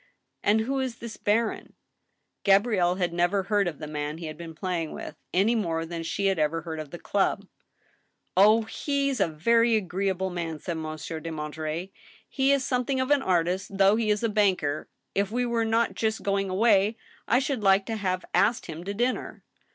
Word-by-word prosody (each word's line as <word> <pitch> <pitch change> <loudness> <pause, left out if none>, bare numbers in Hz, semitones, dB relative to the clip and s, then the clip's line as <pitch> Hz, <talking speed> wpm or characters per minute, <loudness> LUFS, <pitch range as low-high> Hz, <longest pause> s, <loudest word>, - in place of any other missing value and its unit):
" - - -48
And 215 +2 +3
who 270 +4 -1
is 260 -3 -2
this 235 -2 -8
baron? 220 +2 -1 0.3
" - - -51
Gabrielle 195 -3 +3
had 180 -2 -1
never 175 +3 +1
heard 205 0 +1
of 160 -4 -4
the - - -6
man 150 0 -4
he 165 - -7
had 155 -1 -6
been 165 0 -9
playing 170 -2 -3
with, - - -7 0.2
any 200 +6 +3
more 165 -7 -1
than 165 0 -5
she 195 +4 -2
had 195 -3 +2
ever 155 +2 0
heard 160 -1 -5
of 155 -2 -6
the 175 - -7
club. 200 +1 0 0.5
" - - -44
Oh! 215 +4 +6
he's 275 +3 -1
a - - +3
very 230 +8 +3
ag^eable 190 -1 -2
man," 165 -2 -3
said 170 +2 -4
Monsieur 160 +1 -5
de 165 +1 -6
Monterey. 155 +3 -4 0.2
" - - -27
He 270 +1 +4
is 275 -2 +2
something 255 +1 0
of 260 +2 0
an 290 -1 +4
artist, 185 0 0
though 195 +1 +5
he 225 -1 0
is 210 +1 +1
a - - +3
banker. 190 -9 +1 0.2
If 200 0 0
we 245 +3 0
were 235 -1 0
not 225 +1 +1
just 220 -1 -1
going 195 -1 0
away, 205 +2 +3 0.3
I 235 - +4
should 265 -2 -1
like 195 -1 +4
to 225 - -3
have 185 -3 -2
asked 220 +4 +2
him 165 0 -7
to 200 +1 -4
dinner." 245 +4 -2
195 Hz, 205 wpm, -27 LUFS, 170-225 Hz, 0.5 s, Oh